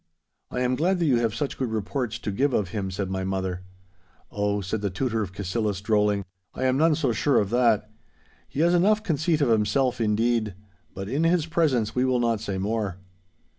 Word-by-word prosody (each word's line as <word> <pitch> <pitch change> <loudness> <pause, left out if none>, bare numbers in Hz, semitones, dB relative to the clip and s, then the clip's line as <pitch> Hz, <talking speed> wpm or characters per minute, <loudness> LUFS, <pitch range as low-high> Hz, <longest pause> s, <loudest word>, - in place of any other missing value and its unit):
'I - - -3
am 125 0 +1
glad 180 +7 +1
that 170 - 0
you 130 -5 +3
have 115 -2 0
such 145 0 -3
good 130 -3 -1
reports 110 +2 -2
to 105 - -4
give 135 +7 +1
of 100 -6 0
him,' 100 -2 -3
said 95 0 -3
my 95 0 -2
mother. 95 -1 -2 0.7
'Oh,' 105 0 0
said 100 +3 -3
the 100 - 0
Tutor 115 +3 -1
of 100 -4 -4
Cassillis, 100 +1 -2
drolling, 105 -1 +1 0.3
'I - - -3
am 130 0 +2
none 160 0 +4
so 140 -5 0
sure 140 +3 +2
of 100 -1 -1
that. 115 -4 +3 0.6
He 145 - -2
has 170 +1 +4
enough 210 +5 +3
conceit 160 -3 0
of 140 - +3
himself, 115 +4 +2
indeed. 110 -1 +1 0.4
But 95 0 -5
in 140 +8 0
his 165 -1 +3
presence 155 -9 +1
we 125 - +1
will 130 -1 +2
not 115 -3 +1
say 100 -4 -3
more. 100 -1 -2
115 Hz, 205 wpm, -25 LUFS, 105-135 Hz, 0.7 s, none